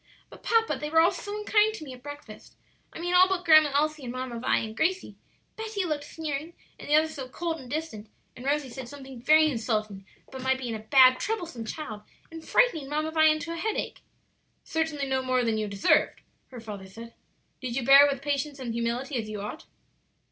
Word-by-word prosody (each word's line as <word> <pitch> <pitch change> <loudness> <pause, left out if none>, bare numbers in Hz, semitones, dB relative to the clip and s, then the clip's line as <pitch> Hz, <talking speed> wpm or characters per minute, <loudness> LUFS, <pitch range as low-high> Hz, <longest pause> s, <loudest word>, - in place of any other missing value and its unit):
"But, - - -14
papa, 450 - +1
they 300 +1 -4
were 325 +1 +4
all 340 +3 +5
so 405 +3 -6
unkind 425 +1 +2
to 325 - -8
me 270 -4 -8
at 250 - -13
breakfast 290 -6 -11 0.4
I - - -10
mean 350 +1 -2
all 365 +1 +6
but 365 -2 -2
Grandma 310 -2 +7
Elsie 305 0 0
and 240 - -4
Mamma 255 -2 -5
Vi 245 - +1
and 220 -1 -4
Gracie. 370 +7 -1 0.4
Betty 435 -3 -3
looked 300 -3 -3
sneering, 310 +1 -5 0.2
and - - -10
the 295 - +4
others 315 +1 +3
so 265 -4 -7
cold 330 +3 -3
and 255 -3 -11
distant, 285 -8 -5 0.3
and 245 - -11
Rosie 280 -1 -1
said 255 -1 -8
something 265 -3 -10
very 310 +4 +5
insulting 215 -7 -2 0.2
about 265 - -9
my 265 0 +2
being 250 -3 -5
a 220 - -4
bad, 255 +3 +5
troublesome 340 - -4
child 220 -4 -6 0.3
and 325 -1 -9
frightening 320 - +2
Mamma 305 +2 -1
Vi 315 0 +4
into 310 +1 +2
a - - -6
headache." 425 +6 -3 0.6
"Certainly 320 -3 -2
no 265 -1 0
more 255 -1 +1
than 220 -1 0
you 215 - -2
deserved," 200 -1 +2 0.3
her 250 - -10
father 205 -4 -8
said. 230 +4 -11 0.5
"Did 250 -2 -4
you 255 -2 -2
bear 275 +2 +8
it - - +1
with 275 -1 -5
patience 285 0 -2
and 250 -4 -5
humility, 235 +4 -2
as 220 -2 -4
you 210 -1 -5
ought?" 210 +10 -7
285 Hz, 215 wpm, -27 LUFS, 245-320 Hz, 0.6 s, bear